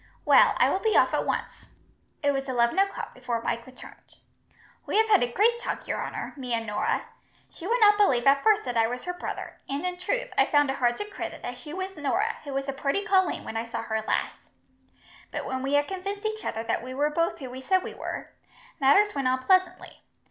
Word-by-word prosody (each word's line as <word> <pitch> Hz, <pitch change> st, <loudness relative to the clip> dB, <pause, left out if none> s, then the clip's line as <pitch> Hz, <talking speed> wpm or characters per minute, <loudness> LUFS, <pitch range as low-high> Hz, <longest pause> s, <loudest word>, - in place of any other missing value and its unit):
Well, -, -, +6 dB
I -, -, +5 dB
will -, -, 0 dB
be 440 Hz, +1 st, +2 dB
off -, -, +4 dB
at -, -, 0 dB
once." -, -, -3 dB, 0.6 s
It 285 Hz, -, +4 dB
was 270 Hz, -1 st, -3 dB
eleven 240 Hz, +6 st, +2 dB
o'clock 395 Hz, 0 st, -1 dB
before 250 Hz, -2 st, -3 dB
Mike 230 Hz, +1 st, -2 dB
returned. 255 Hz, 0 st, -14 dB, 0.7 s
"We -, -, 0 dB
have 445 Hz, 0 st, +4 dB
had 415 Hz, -3 st, +5 dB
a 245 Hz, -, 0 dB
great 465 Hz, -, +3 dB
talk, 475 Hz, -, -5 dB
your -, -, -2 dB
honour, -, -, -5 dB
me 250 Hz, -4 st, -3 dB
and 230 Hz, 0 st, -3 dB
Norah. 210 Hz, -1 st, -1 dB, 0.5 s
She 345 Hz, -, -8 dB
would 480 Hz, +3 st, +2 dB
not 415 Hz, -2 st, +6 dB
believe 255 Hz, -13 st, +3 dB
at 275 Hz, 0 st, +5 dB
first 430 Hz, -1 st, +4 dB
that 245 Hz, -, -4 dB
I 225 Hz, -1 st, +3 dB
was 245 Hz, +1 st, -5 dB
her 360 Hz, -, -3 dB
brother, 355 Hz, -, -6 dB
and 280 Hz, +5 st, -2 dB
in 360 Hz, 0 st, -2 dB
truth, -, -, -2 dB
I -, -, +4 dB
found 290 Hz, -2 st, +3 dB
it 270 Hz, -, -4 dB
hard 240 Hz, -2 st, +1 dB
to 415 Hz, -, -3 dB
credit 415 Hz, -, -7 dB
that 245 Hz, -, -5 dB
she 250 Hz, +4 st, -10 dB
was 375 Hz, +3 st, -5 dB
Norah, 305 Hz, +8 st, 0 dB
who 285 Hz, -, -7 dB
was 275 Hz, 0 st, -2 dB
a 275 Hz, -, -2 dB
purty 280 Hz, +8 st, -1 dB
colleen 380 Hz, -3 st, +2 dB
when -, -, -7 dB
I 225 Hz, -, -2 dB
saw 230 Hz, -, -5 dB
her 220 Hz, -1 st, -2 dB
last; 215 Hz, -, -2 dB, 0.9 s
but -, -, -5 dB
when 260 Hz, 0 st, -3 dB
we 275 Hz, +2 st, 0 dB
had 290 Hz, 0 st, +2 dB
convinced 395 Hz, +2 st, -5 dB
each 435 Hz, 0 st, -3 dB
other 225 Hz, 0 st, -3 dB
that -, -, -1 dB
we 255 Hz, +2 st, -7 dB
were 295 Hz, +2 st, +1 dB
both 335 Hz, +2 st, 0 dB
who 260 Hz, -5 st, -8 dB
we 260 Hz, +1 st, -8 dB
said 370 Hz, +6 st, +2 dB
we -, -, -6 dB
were, -, -, -6 dB, 0.5 s
matters 395 Hz, +10 st, +5 dB
went 275 Hz, -2 st, -1 dB
on 255 Hz, 0 st, 0 dB
pleasantly. 370 Hz, 0 st, +1 dB
285 Hz, 235 wpm, -27 LUFS, 255-390 Hz, 0.9 s, Well